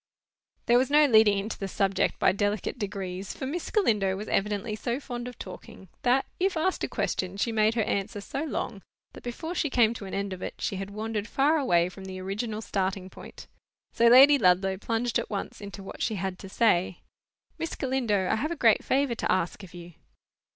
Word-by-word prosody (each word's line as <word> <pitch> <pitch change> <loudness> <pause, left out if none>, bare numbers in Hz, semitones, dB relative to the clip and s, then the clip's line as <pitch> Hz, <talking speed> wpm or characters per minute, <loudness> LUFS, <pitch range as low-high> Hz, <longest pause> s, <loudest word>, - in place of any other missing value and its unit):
There 240 +1 +5
was 260 - +1
no 300 +1 +6
leading 220 -5 +5
into 205 +3 -4
the 195 - -3
subject 195 0 0
by - - +4
delicate 205 +3 -2
degrees, 195 -2 -5
for - - -5
Miss 315 +6 -4
Galindo 210 - +2
was 210 +2 -6
evidently 210 +1 -1
so 235 +4 -2
fond 245 -3 -6
of 250 - -9
talking, 190 0 -10
that, 255 +2 +3
if 375 -1 +1
asked 360 +4 0
a - - +1
question, 185 +1 -2
she 230 +3 0
made 220 0 +2
her 225 - +2
answer 200 0 -2
so 270 +8 -4
long, 235 -9 -4 0.3
that - - -12
before 320 +8 -5
she 315 -4 0
came 235 -3 +3
to 215 - -8
an 190 - -5
end 200 -1 -2
of 185 - -8
it, - - -5
she 195 - -3
had 195 +1 -5
wandered 215 0 -4
far 290 +6 +2
away 175 -11 +3
from 190 +1 -10
the 185 -1 -7
original 210 +4 -4
starting 190 -2 -2
point. - - -11 0.5
So 235 - +4
Lady 275 +4 +8
Ludlow 190 0 +3
plunged 230 +3 -1
at - - -5
once 205 0 -5
into 200 -1 -8
what - - -9
she 220 - 0
had 190 -1 -4
to 195 - -9
say. 185 -5 +1 0.6
"Miss 330 - -3
Galindo, 240 -8 0
I 220 - +1
have 300 +8 -1
a 340 - -3
great 230 -7 +4
favour 275 -1 +1
to 230 - -1
ask 185 +1 0
of 180 -3 -12
you." 175 0 -10
210 Hz, 210 wpm, -27 LUFS, 195-245 Hz, 0.6 s, Lady